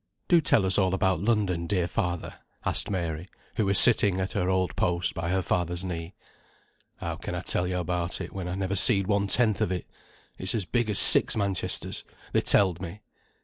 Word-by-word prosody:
"Do 175 -2 +3
tell 110 -9 +2
us 95 +1 +3
all 95 -1 0
about 95 -3 -1
London, 100 -5 -1
dear 90 -2 -1
father," 85 +1 -5 0.3
asked - - +2
Mary, 85 -2 -5 0.3
who 110 -4 0
was 100 - +2
sitting 100 -5 +5
at 95 0 -4
her 90 - -2
old 95 -3 -1
post 85 0 0
by 85 0 -5
her 95 0 -1
father's 90 +1 -3
knee. 85 0 -7 0.8
"How - - -6
can - - -7
I - - -4
tell 90 - 0
yo 90 0 -3
a' - - -2
about 90 0 -4
it, - - -8
when 95 -2 -6
I 90 - -5
never 95 0 -3
seed 100 +1 +5
one 100 0 -1
tenth 110 -1 +1
of - - -1
it. 90 - -4 0.5
It's - - -2
as 105 -5 -3
big 120 +3 -2
as 105 - 0
six - - +7
Manchesters, 100 -4 -3 0.3
they - - +2
telled 95 -3 +3
me. 95 +3 -9
95 Hz, 205 wpm, -25 LUFS, 90-100 Hz, 0.8 s, six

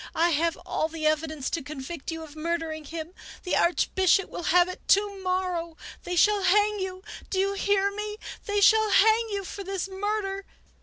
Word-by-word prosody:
I 340 +1 +3
have 330 +2 +1
all 315 - -1
the 320 -1 -5
evidence 310 -2 0
to 330 - -1
convict 290 +2 -7
you 325 -1 -4
of 305 -1 -12
murdering 320 -1 -3
him! 325 +3 -7 0.3
The 360 - 0
Archbishop 375 +2 +2
will 345 - -6
have 355 +1 +5
it 365 - -7
to 400 0 +3
morrow! 365 -3 -2 0.3
They 355 - -2
shall 415 +3 +4
hang 415 +2 +3
you! 375 0 -5 0.3
Do 385 - -2
you 395 +1 +1
hear 400 0 +1
me? 420 +1 -5 0.3
They 410 0 +1
shall 435 +1 +5
hang 440 +3 +4
you 400 -1 -3
for 395 +2 -7
this 390 -1 -3
murder 390 0 -3
370 Hz, 185 wpm, -26 LUFS, 330-400 Hz, 0.3 s, have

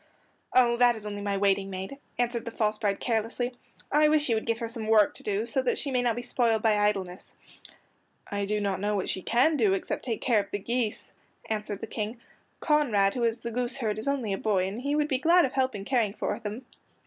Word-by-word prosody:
"Oh, 240 -2 +4
that 245 -1 +5
is 215 -1 -4
only 205 -1 -5
my 200 -1 -1
waiting 195 0 +1
maid," 190 +8 -6 0.2
answered 240 -1 -1
the - - -3
false 215 -2 -1
bride 200 -3 0
carelessly. 235 +2 -1 0.4
"I 300 +1 +5
wish 300 -2 +2
you 230 - +3
would 220 - -3
give 230 -1 +1
her 230 -1 -4
some 225 -1 -3
work 215 -2 +5
to - - -8
do 210 +1 -1
so 240 +3 0
that 255 - 0
she 280 - -3
may 250 -1 +2
not 240 -2 +1
be 240 - -4
spoiled 230 -3 +1
by 220 -2 +4
idleness." 195 -3 -1 0.9
"I 200 0 -2
do 210 +1 -1
not 200 -2 -1
know 205 +1 0
what 190 - -1
she 190 - -1
can 255 - +3
do 210 -6 +3
except 195 - -4
take 230 -4 -2
care 235 -4 +2
of 200 - -4
the - - -2
geese," 230 +1 -2 0.4
answered 210 -2 -3
the - - -3
King. 220 +2 -4 0.4
"Conrad, 230 -11 +3
who 245 - -2
is 230 0 0
the 235 - -4
goose 245 +2 -2
herd, 215 -5 -2
is 220 - -3
only 260 -8 0
a 195 - -3
boy, 195 -4 +1
and 205 +5 -5
he 285 +2 -1
would 300 0 +1
be 265 -4 0
glad 340 +3 +5
of 265 - -4
help 260 -3 0
in 200 -1 -6
caring 225 -5 +1
for - - -2
them." 225 +3 -6
225 Hz, 245 wpm, -28 LUFS, 205-250 Hz, 0.9 s, that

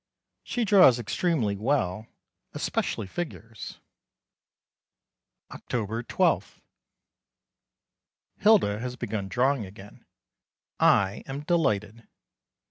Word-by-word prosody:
She 245 -3 -2
draws 185 - +7
extremely 120 - 0
well, 110 -3 -1 0.5
especially - - -2
figures. 115 - -7 1.7
October 115 -1 -3
12. - - 0 1.8
Hilda 200 - +4
has 125 +1 -5
begun 105 -4 -4
drawing 125 +4 +1
again. 100 +1 -14 0.8
I 100 +1 +3
am 135 +1 -5
delighted. 115 - -1
115 Hz, 75 wpm, -27 LUFS, 105-145 Hz, 1.8 s, draws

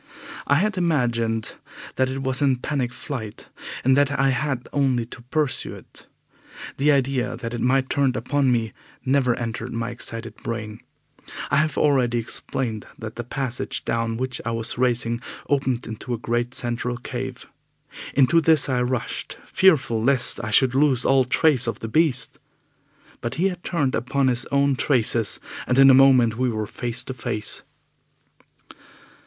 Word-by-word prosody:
I 145 - +4
had 195 +4 +1
imagined 120 -9 0 0.4
that 130 0 +1
it 135 +1 -4
was 130 0 +1
in 135 -2 +3
panic 125 -1 -2
flight, 125 -6 -7 0.3
and 130 +1 +4
that 140 0 +2
I 135 0 +3
had 130 -1 -1
only 130 -4 +1
to 120 - -11
pursue 135 +2 -2
it. - - -15 0.7
The 145 +2 +3
idea 130 -2 0
that 115 0 -6
it 120 - -4
might 130 +2 +2
turn 135 -2 +1
upon 135 +2 +1
me 115 -3 0 0.3
never 130 -2 +2
entered 115 +1 -5
my 115 +1 -3
excited 115 -1 -5
brain. 110 -2 -5 0.7
I 140 - +3
have 155 -1 +1
already 130 -5 +2
explained 115 -1 -3
that 110 0 -7
the 120 - -4
passage 125 +1 -4
down 115 -1 -1
which 130 0 -2
I - - -3
was 115 -1 -2
racing 120 -1 0 0.3
opened 130 -3 0
into 115 +2 -5
a - - -6
great 120 +2 -2
central 120 0 -1
cave. 125 - -6 0.7
Into 145 +5 +5
this 160 -2 +4
I 125 -2 0
rushed, 125 -1 -3
fearful 140 -12 +3
lest 130 0 +2
I 110 - -3
should 125 +3 +4
lose 135 -3 +2
all 135 -1 +4
trace 130 -1 +3
of 115 - -2
the 115 - -6
beast. 140 +1 +1 0.8
But 120 +2 -3
he 185 +4 +2
had 180 -2 -8
turned 145 -7 0
upon 130 +3 +1
his 120 -1 0
own 140 -1 +2
traces, 120 -6 +2 0.3
and 125 - +1
in 135 0 +8
a - - +7
moment 130 -4 +5
we 130 0 +2
were 110 -2 -2
face 120 +3 -3
to 130 - -6
face. 105 -4 -2
125 Hz, 160 wpm, -23 LUFS, 115-140 Hz, 0.8 s, in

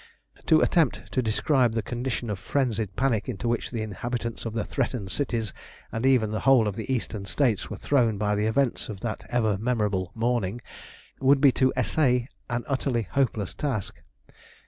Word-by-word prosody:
To 155 - +6
attempt 125 -10 +1
to 130 - +1
describe 120 +2 +2
the 115 -1 -1
condition 120 -2 -3
of 100 - -4
frenzied 110 -8 -1
panic 125 -4 0
into 120 0 -3
which 120 0 -1
the 115 -3 -3
inhabitants 115 +3 -4
of 110 - -5
the 110 - -1
threatened 120 -7 -2
cities, 115 -5 -1 0.4
and 115 +4 0
even 120 -5 +3
the 110 - -1
whole 130 -4 +5
of 100 - -2
the 110 +4 -4
Eastern 110 -5 -2
States 120 -7 +1
were - - -5
thrown 120 -7 +2
by 105 0 0
the 105 +1 +1
events 125 +2 0
of 100 -3 -7
that 115 -2 -4
ever 110 -5 +1
memorable 105 -6 0
morning, 115 -2 0 0.6
would 135 +1 +4
be 140 -1 +6
to 130 +1 +2
essay 125 -1 +2 0.2
an 120 0 -1
utterly 130 -3 0
hopeless 110 -7 0
task. 115 -8 -3
115 Hz, 175 wpm, -26 LUFS, 110-130 Hz, 0.6 s, To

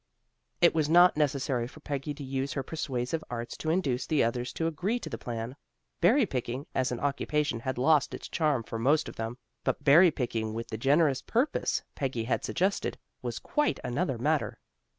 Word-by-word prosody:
It 170 - +6
was 155 -2 +1
not 175 +2 +7
necessary 135 -4 0
for 155 - -14
Peggy 145 -1 -4
to 145 - -8
use 135 +1 -2
her 135 - -2
persuasive 135 0 -3
arts 120 -1 -5
to 160 - -3
induce 145 -7 0
the 155 -3 +3
others 120 +2 -1
to 165 - -2
agree 175 +9 0
to - - -7
the - - -3
plan. 120 +1 -5 0.4
Berry 230 +9 +5
picking 125 - -3
as 130 -1 0
an 120 - -3
occupation 145 -2 0
had 130 +2 -3
lost 145 +3 +3
its - - -8
charm 150 -7 +1
for 115 +1 -5
most 145 +6 +3
of - - -8
them, 115 +2 -4 0.3
but - - -1
berry 170 +6 +7
picking 115 -6 -2
with 115 +1 -5
the - - -4
generous 140 +1 +3
purpose 245 +6 0
Peggy 130 -5 -2
had 120 - -1
suggested, 195 +3 0 0.2
was - - -4
quite 295 -1 0
another 130 +2 -1
matter. 150 +5 0
140 Hz, 190 wpm, -29 LUFS, 125-160 Hz, 0.4 s, not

